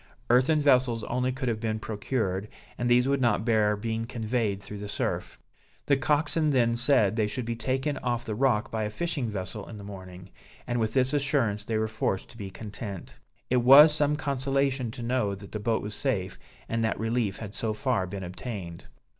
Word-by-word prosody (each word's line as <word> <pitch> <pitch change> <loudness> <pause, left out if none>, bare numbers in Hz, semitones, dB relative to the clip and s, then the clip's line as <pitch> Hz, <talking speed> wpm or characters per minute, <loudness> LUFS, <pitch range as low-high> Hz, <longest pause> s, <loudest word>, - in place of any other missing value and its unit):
Earthen 145 +5 +4
vessels 125 -5 +3
only 125 +3 -1
could 130 0 -4
have 115 -2 0
been 110 -1 -1
procured, 105 -2 -2 0.3
and 120 0 -1
these 125 +1 +4
would 140 -1 +1
not 115 -3 +2
bear 110 -3 +3
being 110 +2 -3
conveyed 110 -3 -1
through 105 +1 -9
the 105 0 -6
surf. - - -3 0.5
The 140 - +4
coxswain 150 +3 +1
then 120 -4 +3
said 120 -5 +3
they 110 -2 +1
should 120 +3 -4
be 115 0 -2
taken 135 +4 -1
off 120 -1 -2
the 110 - -3
rock 120 -1 +1
by 110 -1 -1
a 105 - -1
fishing 140 +1 -2
vessel 100 0 -5
in 110 - -8
the 100 - -9
morning, 95 -2 -10 0.3
and 120 0 -1
with 110 -1 0
this 130 0 +2
assurance 135 -8 +1
they 110 0 -1
were 110 0 0
forced 110 -3 -2
to 115 - -15
be 100 -3 -6
content. 105 -1 -8 0.3
It 130 - +4
was 140 +5 +9
some 150 -1 +2
consolation 135 -3 0
to 120 +1 -7
know 115 -5 0
that 100 0 -12
the 105 - -4
boat 110 +1 0
was 105 +1 -5
safe, 100 -9 -2 0.3
and 115 0 -1
that 110 - 0
relief 110 -3 0
had 105 -3 -7
so 110 -1 -1
far 115 -4 0
been 95 +1 -6
obtained. 90 -2 -7
115 Hz, 200 wpm, -27 LUFS, 105-130 Hz, 0.5 s, was